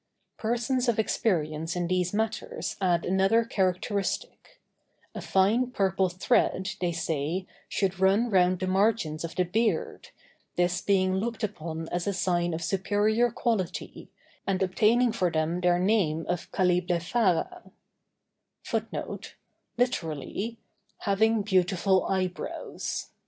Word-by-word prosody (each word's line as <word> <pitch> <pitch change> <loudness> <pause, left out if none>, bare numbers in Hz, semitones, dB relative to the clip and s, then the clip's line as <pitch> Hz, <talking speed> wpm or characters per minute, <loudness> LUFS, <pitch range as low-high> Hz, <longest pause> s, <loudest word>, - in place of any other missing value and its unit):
Persons 240 +2 0
of 230 - +1
experience 165 -7 0
in 175 -1 -1
these 180 0 0
matters 220 +1 -2
add 175 -3 +2
another 195 +5 +3
characteristic; 200 - -2 0.5
a - - -6
fine 215 +7 +2
purple 190 -5 +1
thread, 190 +1 +1
they 175 -1 +1
say, 165 +2 -2 0.2
should 190 -2 -1
run 195 +5 +4
round 185 -1 +4
the 185 - -1
margins 190 -5 +1
of 165 +1 -5
the 180 - +2
beard, 195 0 -1 0.5
this 180 +1 +1
being 190 -1 +2
looked 225 +3 -3
upon 165 -5 -4
as 175 +1 -2
a 200 - +1
sign 175 -2 0
of 165 - -4
superior 210 +5 +2
quality, 225 -6 -3 0.4
and 195 -1 +1
obtaining 225 +6 +3
for 185 -6 +1
them 160 +2 -1
their 175 -1 +3
name 180 -5 +1
of 175 -1 -3
"calliblephara." 180 - +1
190 Hz, 105 wpm, -27 LUFS, 175-215 Hz, 0.5 s, run